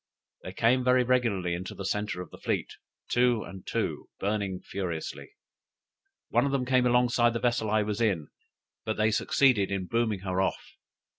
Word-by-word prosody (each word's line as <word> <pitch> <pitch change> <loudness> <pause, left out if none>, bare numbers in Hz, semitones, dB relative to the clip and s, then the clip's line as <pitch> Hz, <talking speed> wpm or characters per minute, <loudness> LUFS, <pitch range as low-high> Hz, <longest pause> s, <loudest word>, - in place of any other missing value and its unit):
They 95 - -7
came 125 +5 +3
very 125 0 +4
regularly 115 -8 +1
into 90 +2 -5
the 100 - -6
centre 105 -3 -2
of 85 - -16
the - - -12
fleet, - - -2 0.3
two 120 -2 +2
and 95 -1 -11
two, - - -2
burning 100 -2 -1
furiously; 90 - -5 1.0
one - - +3
of - - -1
them 135 -2 0
came 125 -1 +3
alongside 120 -1 +3
of 120 - +1
the 115 - -1
vessel 120 -3 0
I 105 0 +2
was 105 +2 -3
in, 95 -10 0 0.5
but 110 - -2
they 110 +1 +3
succeeded 110 -2 +3
in 95 -2 -2
booming 110 -2 0
her 95 -1 -1
off. 95 - -2
110 Hz, 175 wpm, -28 LUFS, 95-120 Hz, 1.0 s, very